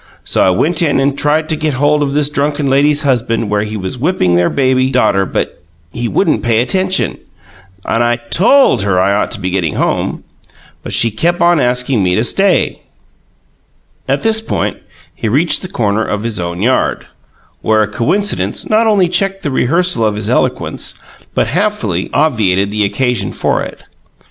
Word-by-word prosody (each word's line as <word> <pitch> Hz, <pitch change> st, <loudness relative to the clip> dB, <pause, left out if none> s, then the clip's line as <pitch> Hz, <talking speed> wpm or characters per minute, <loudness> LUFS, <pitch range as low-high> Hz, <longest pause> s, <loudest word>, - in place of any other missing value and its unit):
So -, -, +1 dB
I -, -, +4 dB
went 155 Hz, -, +1 dB
in 145 Hz, -5 st, +2 dB
and 135 Hz, +1 st, +1 dB
tried 150 Hz, +2 st, +1 dB
to 160 Hz, -, 0 dB
get 155 Hz, -2 st, -2 dB
hold 145 Hz, +2 st, +2 dB
of 140 Hz, -1 st, -1 dB
this 145 Hz, 0 st, +2 dB
drunken 145 Hz, 0 st, -1 dB
lady's 145 Hz, +2 st, +2 dB
husband 115 Hz, -5 st, 0 dB
where 105 Hz, 0 st, +1 dB
he 105 Hz, +1 st, -4 dB
was 95 Hz, +6 st, -5 dB
whipping 140 Hz, -, +1 dB
their 85 Hz, 0 st, +2 dB
baby 130 Hz, -1 st, +1 dB
daughter, 100 Hz, -7 st, +1 dB
but -, -, -3 dB, 0.3 s
he 120 Hz, +5 st, -3 dB
wouldn't 160 Hz, -, +1 dB
pay 120 Hz, -1 st, +1 dB
any 115 Hz, -, +3 dB
attention, 185 Hz, +6 st, -1 dB, 0.7 s
and 115 Hz, -, +1 dB
I 120 Hz, 0 st, +2 dB
TOLD 210 Hz, -, +3 dB
her 100 Hz, -2 st, +1 dB
I 95 Hz, +2 st, +2 dB
ought 100 Hz, -, 0 dB
to -, -, -6 dB
be 90 Hz, +1 st, -3 dB
getting 90 Hz, -4 st, -1 dB
home, -, -, -1 dB, 0.6 s
but -, -, -7 dB
she 115 Hz, -, +3 dB
kep' 170 Hz, +11 st, 0 dB
on 175 Hz, -1 st, +3 dB
askin' 125 Hz, -2 st, +1 dB
me 90 Hz, -1 st, +1 dB
to 110 Hz, -, +1 dB
stay 195 Hz, +10 st, +1 dB, 0.6 s
" -, -, -41 dB
At -, -, 0 dB
this 220 Hz, -1 st, +2 dB
point 225 Hz, -, -2 dB, 0.4 s
he 110 Hz, -, -3 dB
reached 150 Hz, +9 st, +2 dB
the 185 Hz, -, -6 dB
corner 110 Hz, -, -1 dB
of 105 Hz, -1 st, -3 dB
his 115 Hz, -4 st, -3 dB
own 85 Hz, +2 st, -4 dB
yard, 130 Hz, +2 st, 0 dB, 0.6 s
where 110 Hz, 0 st, +2 dB
a -, -, -2 dB
coincidence 130 Hz, -, -1 dB
not 220 Hz, +1 st, +2 dB
only 200 Hz, -4 st, +3 dB
checked 195 Hz, +2 st, -1 dB
the 145 Hz, -, -2 dB
rehearsal 165 Hz, +1 st, +1 dB
of 105 Hz, -1 st, +1 dB
his 105 Hz, +2 st, -3 dB
eloquence 125 Hz, 0 st, -1 dB, 0.4 s
but -, -, +2 dB
happily -, -, -1 dB
obviated 100 Hz, -9 st, +1 dB
all 105 Hz, 0 st, +1 dB
occasion 105 Hz, -1 st, -1 dB
for -, -, -1 dB
it. -, -, -8 dB
125 Hz, 185 wpm, -14 LUFS, 105-155 Hz, 0.7 s, I